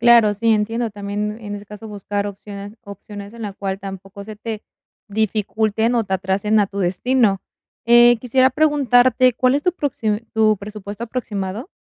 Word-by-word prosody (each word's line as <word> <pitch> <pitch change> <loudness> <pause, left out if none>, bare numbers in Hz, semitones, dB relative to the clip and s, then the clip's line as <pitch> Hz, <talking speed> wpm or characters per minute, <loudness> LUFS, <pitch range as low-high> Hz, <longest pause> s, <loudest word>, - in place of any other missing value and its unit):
Claro, 235 -3 +6
sí, 225 +2 +2
entiendo 225 +2 0
también, 205 +1 -4
en 205 -2 -5
ese 205 - -11
caso, 210 +2 -10
buscar 205 0 -3
opciones 200 +1 -9
opciones, 200 +1 -9
en 230 - -9
la 205 - -4
cual, 195 0 -4
tampoco 195 0 -8
se 215 +1 -9
te 220 0 -5 0.5
dificulten 220 +2 0
o 230 - +1
te 190 - -1
atrasen 195 +3 +1
a 200 - +1
tu 200 - -7
destino. 195 +3 +1 0.4
Eh, 240 +1 +7
quisiera 260 +1 +3
preguntarte, 255 -4 +4
¿cuál 255 +3 +2
es 290 - -4
tu 360 - +3
proxi 225 - -1
tu 215 -1 +3
presupuesto 205 +1 -8
aproximado? 220 - -4
215 Hz, 170 wpm, -20 LUFS, 200-235 Hz, 0.5 s, Eh